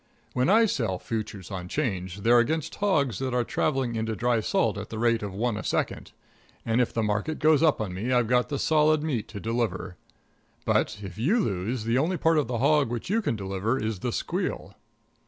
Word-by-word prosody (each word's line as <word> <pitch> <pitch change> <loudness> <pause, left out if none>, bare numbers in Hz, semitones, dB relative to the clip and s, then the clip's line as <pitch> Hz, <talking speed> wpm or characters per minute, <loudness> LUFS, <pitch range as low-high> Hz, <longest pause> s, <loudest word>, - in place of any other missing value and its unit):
When 125 +6 +1
I 225 +3 +6
sell 115 - -1
futures 105 -2 -5
on 90 -2 -5
'Change, 95 - -3
they're 120 +3 +5
against 155 +6 0
hogs 140 - +1
that 130 -2 -2
are 125 - +2
traveling 130 -1 0
into 110 0 -2
dry 120 +3 +1
salt 110 - +1
at - - -7
the 110 - -6
rate 115 0 +2
of 105 -1 -4
one 110 +3 -1
a - - -5
second, - - -2 0.5
and 115 +2 +2
if 125 - 0
the 115 - -1
market 105 +9 -1
goes 155 0 +4
up 160 -3 +3
on 100 -5 -3
me 110 +8 -3
I've 125 -2 +3
got 125 +2 +2
the 145 - -2
solid 155 +1 +3
meat 135 -9 -2
to 105 - -8
deliver. 100 -5 -2 0.7
But, - - +1
if 95 +1 -8
you 180 - +2
lose, 105 - -1
the 115 +3 +1
only 175 +6 0
part 165 -1 +3
of 145 - -1
the 120 0 -2
hog 140 +1 +3
which 120 - -4
you 225 +2 +2
can 155 - -1
deliver 100 +4 -1
is 110 -5 -2
the 120 - -2
squeal. - - -3
120 Hz, 210 wpm, -26 LUFS, 105-145 Hz, 0.7 s, I